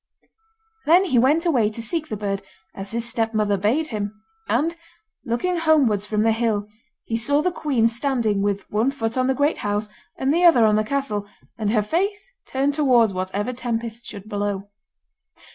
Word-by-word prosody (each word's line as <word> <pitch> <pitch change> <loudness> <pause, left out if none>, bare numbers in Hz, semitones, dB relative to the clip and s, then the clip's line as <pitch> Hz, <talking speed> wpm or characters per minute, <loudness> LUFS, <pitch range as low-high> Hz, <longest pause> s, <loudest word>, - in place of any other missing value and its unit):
Then 355 +5 +6
he 260 -10 +3
went 295 +8 +3
away 245 -11 +3
to 215 - -9
seek 310 +8 -3
the 215 - -3
bird, 200 -1 -2 0.3
as 195 0 -7
his 235 +2 -2
stepmother 220 -3 0
bade 230 +11 0
him; 210 -1 -4 0.3
and, 315 +8 +1 0.5
looking 345 +10 -1
homewards 270 -11 +3
from 210 0 +1
the 225 - +4
hill, 220 -2 0 0.4
he 225 - -3
saw 285 +6 +1
the 365 - +1
queen 275 -9 +1
standing 230 -4 0
with 200 0 -1
one 220 +5 +2
foot 230 -5 -3
on 255 0 +1
the 265 - +1
great 290 +3 +1
house, 205 +1 -2 0.3
and 270 +2 +1
the 345 +2 +2
other 265 -10 +7
on 210 -1 +4
the 215 - +2
castle, 215 -5 -2 0.3
and 215 -3 -2
her 215 -1 +2
face 400 - -2 0.2
turned 275 +2 0
towards 250 -8 +3
whatever 190 +6 -2
tempest 235 -1 -4
should 205 -1 -9
blow. 205 -1 -3
230 Hz, 180 wpm, -22 LUFS, 210-280 Hz, 0.5 s, other